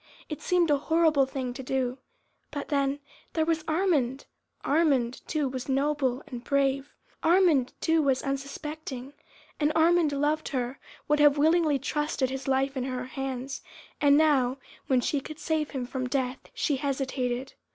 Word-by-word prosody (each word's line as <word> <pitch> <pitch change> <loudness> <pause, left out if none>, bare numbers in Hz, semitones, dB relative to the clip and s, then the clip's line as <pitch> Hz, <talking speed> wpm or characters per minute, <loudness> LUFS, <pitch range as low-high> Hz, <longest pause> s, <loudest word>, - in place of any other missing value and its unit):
It 305 - -5
seemed 350 -3 +2
a 285 - +3
horrible 315 -3 +3
thing 260 -2 -4
to 265 - -7
do. 255 0 -1 0.5
But 285 -1 -5
then, 280 0 0 0.3
there 320 -1 +1
was 325 -1 0
Armand! 310 -7 +1 0.4
Armand, 275 -6 +2
too, 300 -3 0
was 260 0 -5
noble 275 -1 +1
and 245 -5 -8
brave, 275 0 +1 0.3
Armand, 330 -7 +4
too, 325 0 +3
was 270 -3 +1
unsuspecting. 275 -1 -5 0.5
And 300 0 +2
Armand 330 -1 +4
loved 295 +2 0
her, 255 -1 -3 0.3
would 300 0 +2
have 295 -1 +6
willingly 315 0 +3
trusted 285 -1 -1
his 265 +1 -5
life 270 +1 +1
in 255 -1 -2
her 255 -1 -3
hands, 270 +1 -5 0.4
and 285 -1 +6
now, 275 -5 +3 0.3
when 255 -2 +3
she 285 +3 0
could 310 +2 -9
save 315 -1 -1
him 260 -3 -4
from 255 0 -4
death, 260 -1 -1 0.2
she 290 -4 0
hesitated. 265 -2 -2
280 Hz, 155 wpm, -28 LUFS, 260-305 Hz, 0.5 s, have